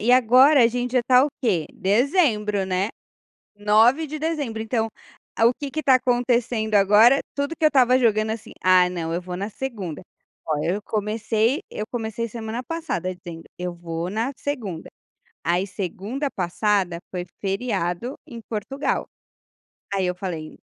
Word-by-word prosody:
e 240 Hz, +4 st, +3 dB
agora 255 Hz, +3 st, +6 dB
a -, -, +7 dB
gente 245 Hz, +1 st, -3 dB
já 255 Hz, -, +4 dB
está 250 Hz, +2 st, +5 dB
o -, -, 0 dB
quê? 180 Hz, -10 st, +1 dB
Dezembro 210 Hz, -, +2 dB
né, 190 Hz, +3 st, -1 dB, 0.7 s
9 225 Hz, +9 st, +4 dB
de 305 Hz, +2 st, -5 dB
dezembro, 290 Hz, -8 st, -2 dB
então, 225 Hz, 0 st, 0 dB, 0.5 s
o 230 Hz, +2 st, +6 dB
que 285 Hz, -2 st, -4 dB
que 310 Hz, -, -4 dB
está 265 Hz, -2 st, +5 dB
acontecendo, 240 Hz, -3 st, +1 dB
agora 210 Hz, +6 st, +6 dB, 0.2 s
tudo 285 Hz, +3 st, -2 dB
que 315 Hz, -, -7 dB
eu -, -, +8 dB
estava 255 Hz, -3 st, +4 dB
jogando, 220 Hz, -2 st, +2 dB
assim, 225 Hz, -, -7 dB
"Ah 185 Hz, -1 st, +5 dB
não, 165 Hz, -2 st, -3 dB
eu 175 Hz, -, -1 dB
vou 180 Hz, 0 st, -6 dB
na 200 Hz, +2 st, -3 dB
segunda", 205 Hz, -, -5 dB, 0.5 s
olha, 155 Hz, +2 st, 0 dB
eu 205 Hz, -, -3 dB
comecei 220 Hz, -, 0 dB
eu 210 Hz, -, -5 dB
comecei 230 Hz, -1 st, -3 dB
semana 230 Hz, +2 st, -5 dB
passada 320 Hz, -, -3 dB
dizendo, 170 Hz, -2 st, -10 dB, 0.2 s
"Eu 180 Hz, -1 st, -4 dB
vou 170 Hz, 0 st, -4 dB
na 225 Hz, +6 st, -1 dB
segunda", 220 Hz, -, -5 dB, 0.5 s
aí 180 Hz, +3 st, +1 dB
segunda 205 Hz, -, -4 dB
passada 185 Hz, 0 st, 0 dB
foi 180 Hz, -1 st, -3 dB, 0.2 s
feriado 195 Hz, +2 st, -2 dB
em 235 Hz, -2 st, -9 dB
Portugal. 255 Hz, +6 st, -2 dB, 0.9 s
Aí 195 Hz, -2 st, +1 dB
eu 180 Hz, -, -1 dB
falei, 175 Hz, -5 st, -6 dB
220 Hz, 155 wpm, -23 LUFS, 185-250 Hz, 0.9 s, eu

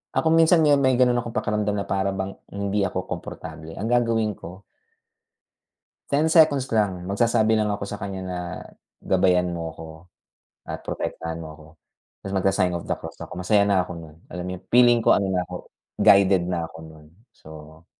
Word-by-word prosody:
ako -, -, +1 dB
minsan 165 Hz, +1 st, +5 dB
me 150 Hz, -1 st, +5 dB
may 130 Hz, -2 st, +3 dB
gano'n 125 Hz, -1 st, +3 dB
akong 115 Hz, -1 st, -8 dB
pakiramdam 105 Hz, -1 st, -1 dB
na 100 Hz, -, -2 dB
para 95 Hz, 0 st, -1 dB
bang 95 Hz, 0 st, -4 dB, 0.2 s
hindi 100 Hz, +1 st, -2 dB
ako -, -, -4 dB
komportable. 80 Hz, 0 st, -8 dB
Ang 105 Hz, -, -4 dB
gagawin 115 Hz, -3 st, +1 dB
ko 90 Hz, +2 st, -11 dB, 1.5 s
10 145 Hz, +2 st, +2 dB
seconds 155 Hz, -5 st, +5 dB
lang, 100 Hz, -5 st, 0 dB
magsasabi 110 Hz, +3 st, +2 dB
lang 110 Hz, -1 st, +2 dB
ako 100 Hz, -1 st, -3 dB
sa 100 Hz, +1 st, -7 dB
kanya 100 Hz, -1 st, -5 dB
na 90 Hz, -1 st, -4 dB, 0.7 s
gabayan 90 Hz, -1 st, +2 dB
mo 85 Hz, -1 st, -4 dB
ako 80 Hz, -, -9 dB, 0.8 s
at -, -, -6 dB
protektahan 80 Hz, 0 st, -4 dB
mo 80 Hz, -1 st, -8 dB
ako. 75 Hz, 0 st, -16 dB, 0.5 s
Tapos 95 Hz, -, -8 dB
magsa-sign 95 Hz, -1 st, +1 dB
of 85 Hz, -, -3 dB
the -, -, -3 dB
cross -, -, -9 dB
ako, -, -, -8 dB
masaya 100 Hz, +3 st, +3 dB
na 100 Hz, -3 st, +2 dB
ako 90 Hz, -, -7 dB
no'n. 80 Hz, -2 st, -11 dB, 0.2 s
Alam 90 Hz, +1 st, -5 dB
yung -, -, -26 dB
feeling 120 Hz, -1 st, +5 dB
ko -, -, +7 dB
ano 100 Hz, -, +1 dB
na 90 Hz, -1 st, -1 dB
ako, -, -, -9 dB, 0.3 s
guided 95 Hz, -2 st, +5 dB
na 85 Hz, -2 st, -2 dB
ako 80 Hz, -, -13 dB
no'n. 80 Hz, -1 st, -14 dB, 0.2 s
So 80 Hz, -2 st, -14 dB
95 Hz, 180 wpm, -24 LUFS, 90-110 Hz, 1.5 s, ko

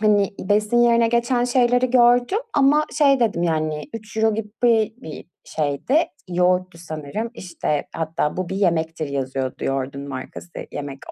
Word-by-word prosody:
hani, 205 Hz, -2 st, +3 dB
besin 210 Hz, +3 st, +1 dB
yerine 235 Hz, -1 st, +4 dB
geçen 240 Hz, +1 st, +1 dB
şeyleri 245 Hz, 0 st, +2 dB
gördüm 245 Hz, -, +4 dB, 0.2 s
ama 290 Hz, +2 st, +4 dB
şey 275 Hz, -3 st, +4 dB
dedim, 210 Hz, -7 st, +1 dB
yani, 155 Hz, -2 st, -1 dB
€3 220 Hz, 0 st, -1 dB
gibi 210 Hz, -1 st, -5 dB, 0.5 s
bir 155 Hz, -, -8 dB, 0.2 s
şeydi. 150 Hz, -, -1 dB, 0.3 s
Yoğurttu 180 Hz, 0 st, +1 dB
sanırım. 165 Hz, +7 st, -5 dB
İşte, 170 Hz, -5 st, -3 dB
hatta 160 Hz, -1 st, -2 dB
"Bu 185 Hz, -2 st, -3 dB
bir 190 Hz, -, -3 dB
yemektir." 165 Hz, -5 st, 0 dB
yazıyordu 130 Hz, -1 st, -3 dB
yoğurdun 135 Hz, +1 st, -3 dB
markası 135 Hz, +6 st, -8 dB, 0.2 s
yemek 140 Hz, -1 st, -6 dB
185 Hz, 135 wpm, -22 LUFS, 155-235 Hz, 0.5 s, yerine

